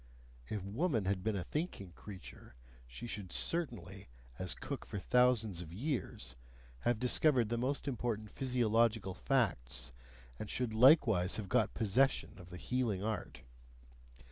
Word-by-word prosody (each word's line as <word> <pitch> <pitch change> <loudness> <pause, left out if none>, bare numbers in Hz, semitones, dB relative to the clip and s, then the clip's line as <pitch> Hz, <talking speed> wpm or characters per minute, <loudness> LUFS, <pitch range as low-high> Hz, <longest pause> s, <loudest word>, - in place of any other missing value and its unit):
If 105 -3 -3
woman 115 - 0
had 95 -1 0
been 110 -1 0
a 95 - -2
thinking 150 - -4
creature, 95 - -11 0.3
she - - -8
should 105 -6 -5
certainly, 105 - -1 0.3
as - - -1
cook - - -5
for - - -6
thousands 115 -4 +3
of 80 -2 -8
years, 100 - -3 0.5
have 120 - +1
discovered 125 0 +3
the 120 - 0
most 135 +4 -1
important 115 -5 -2
physiological 115 -5 +1
facts, 70 - 0 0.5
and 105 - -5
should 125 -3 -1
likewise 110 - +5
have 105 -4 -5
got 120 0 +2
possession 115 -1 +1
of 90 -1 -12
the 90 - -8
healing 110 -1 -1
art! 110 -3 -4
110 Hz, 140 wpm, -35 LUFS, 95-125 Hz, 0.5 s, likewise